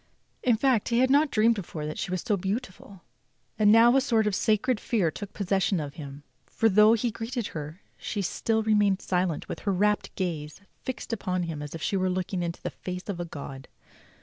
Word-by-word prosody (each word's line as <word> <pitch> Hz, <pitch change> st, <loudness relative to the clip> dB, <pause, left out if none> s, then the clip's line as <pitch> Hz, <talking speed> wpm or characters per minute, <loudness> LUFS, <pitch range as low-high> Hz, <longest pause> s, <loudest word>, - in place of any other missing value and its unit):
In 240 Hz, -3 st, +3 dB
fact 250 Hz, -3 st, +2 dB
he 235 Hz, -, +1 dB
had 260 Hz, +1 st, +4 dB
not 290 Hz, +2 st, +4 dB
dreamed 230 Hz, -1 st, +4 dB
before 170 Hz, -7 st, -6 dB
that 155 Hz, -, -5 dB
she -, -, -3 dB
was 185 Hz, 0 st, -2 dB
so 220 Hz, -4 st, +1 dB
beautiful; 195 Hz, -2 st, -5 dB, 0.6 s
and 210 Hz, -1 st, +6 dB
now 230 Hz, +3 st, +7 dB
a 270 Hz, -, +5 dB
sort 230 Hz, -5 st, +2 dB
of 210 Hz, -, +1 dB
sacred 220 Hz, +4 st, +1 dB
fear 200 Hz, -9 st, 0 dB
took 205 Hz, +3 st, -7 dB
possession 195 Hz, -2 st, 0 dB
of 145 Hz, -2 st, -5 dB
him, 140 Hz, -1 st, -9 dB, 0.2 s
for 225 Hz, -, +2 dB
though 210 Hz, +2 st, +6 dB
he 230 Hz, +1 st, 0 dB
greeted 230 Hz, +2 st, -4 dB
her 155 Hz, +4 st, -7 dB, 0.2 s
she 205 Hz, -2 st, -3 dB
still 220 Hz, +4 st, 0 dB
remained 205 Hz, -3 st, +3 dB
silent 180 Hz, -4 st, -1 dB
with -, -, -5 dB
her 200 Hz, -, -1 dB
rapt 205 Hz, +2 st, +1 dB
gaze 155 Hz, -5 st, -3 dB, 0.2 s
fixed 255 Hz, -2 st, -5 dB
upon 185 Hz, -4 st, -1 dB
him 160 Hz, -3 st, -4 dB
as 150 Hz, +1 st, -6 dB
if 160 Hz, -, -7 dB
she 195 Hz, -, 0 dB
were 185 Hz, 0 st, +1 dB
looking 185 Hz, 0 st, -2 dB
into 170 Hz, -1 st, -4 dB
the -, -, -3 dB
face 180 Hz, +2 st, -7 dB
of 185 Hz, -3 st, -3 dB
a 175 Hz, -, -2 dB
god. 135 Hz, -4 st, -8 dB
200 Hz, 210 wpm, -27 LUFS, 175-225 Hz, 0.6 s, now